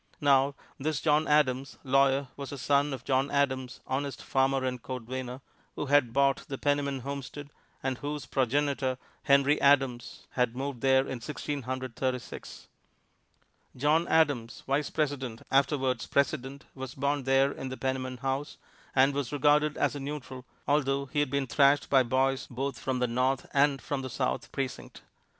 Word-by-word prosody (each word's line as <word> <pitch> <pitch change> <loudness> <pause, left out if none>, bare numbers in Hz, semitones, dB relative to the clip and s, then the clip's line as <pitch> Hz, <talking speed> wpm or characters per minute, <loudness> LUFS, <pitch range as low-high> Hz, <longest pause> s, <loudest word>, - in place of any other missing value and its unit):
Now 140 -1 +3 0.2
this 150 +1 -1
John 155 0 +2
Adams, 135 -3 +2
lawyer, 135 0 +3
was 140 -1 -7
the 140 - -6
son 140 +2 +2
of 135 - -5
John 135 +1 +1
Adams, 130 -3 -1
honest 140 +1 -3
farmer 135 0 +1
and 125 -1 -3
cordwainer, 130 +1 -5 0.3
who - - -3
had 140 -4 +3
bought 140 +1 +3
the 135 - -4
Penniman 140 -2 0
homestead, 140 +2 -6 0.3
and 130 -1 -2
whose 145 0 -4
progenitor, 135 0 0 0.3
Henry 140 +2 +4
Adams, 135 -4 +2
had 125 -2 0
moved 135 -2 -4
there 135 0 +4
in 125 -3 -5
Sixteen 145 +2 -4
Hundred 130 -1 -5
Thirty 130 -1 0
six. 125 - -10 1.1
John 150 +6 +2
Adams, 145 -8 +1
Vice 140 +2 0
President, 135 -7 -2
afterwards 135 -3 +1
President, 140 0 -1
was 130 -2 -7
born 140 0 -1
there 135 +1 +4
in 135 - -6
the 130 - -6
Penniman 130 -1 -2
house, 135 +3 -3 0.4
and 135 +1 +5
was 140 -3 -2
regarded 150 +1 +3
as - - +1
a - - -4
neutral, 135 -2 -6 0.2
although 140 -1 +1
he 140 +2 -2
had 145 - +1
been 140 0 0
thrashed 140 +3 +3
by 135 -2 +6
boys 130 +2 +1
both 135 +1 -3
from 130 -1 -2
the 125 0 +1
North 125 +2 0
and 140 0 +3
from 140 -2 -2
the 130 - -5
South 130 +1 -2
Precinct. 135 -2 -5
135 Hz, 165 wpm, -29 LUFS, 130-145 Hz, 1.1 s, by